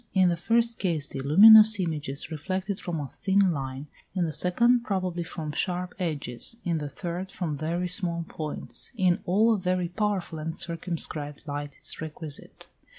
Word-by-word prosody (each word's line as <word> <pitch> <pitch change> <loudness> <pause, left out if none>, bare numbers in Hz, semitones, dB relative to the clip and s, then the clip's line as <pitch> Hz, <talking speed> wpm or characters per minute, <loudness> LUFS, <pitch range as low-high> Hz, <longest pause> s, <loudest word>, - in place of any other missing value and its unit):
In 185 -1 +5
the 170 - +1
first 230 +6 +1
case 160 -6 -1
the - - -6
luminous 215 +9 +8
image 160 -6 -2
is 140 +3 -4
reflected 185 +5 -3
from 170 -4 -4
a 145 - -4
thin 195 +4 +2
line; 135 -2 -4 0.3
in 180 -2 +1
the 160 - -3
second 235 +9 +3
probably 185 -5 -2
from 160 -2 -5
sharp 180 +3 -2
edges; 155 - -3
in 170 -2 0
the 145 -1 -4
third 175 +5 -5
from 170 -6 -3
very 165 +5 -2
small 170 -2 0
points. 155 -2 -4
In 185 -3 +3
all 215 +6 +4
a 210 - -1
very 180 -1 0
powerful 190 -4 -2
and 160 +1 -4
circumscribed 165 -4 -4
light 145 -1 -5
is - - -2
requisite. 155 -1 -8
175 Hz, 170 wpm, -27 LUFS, 155-190 Hz, 0.3 s, luminous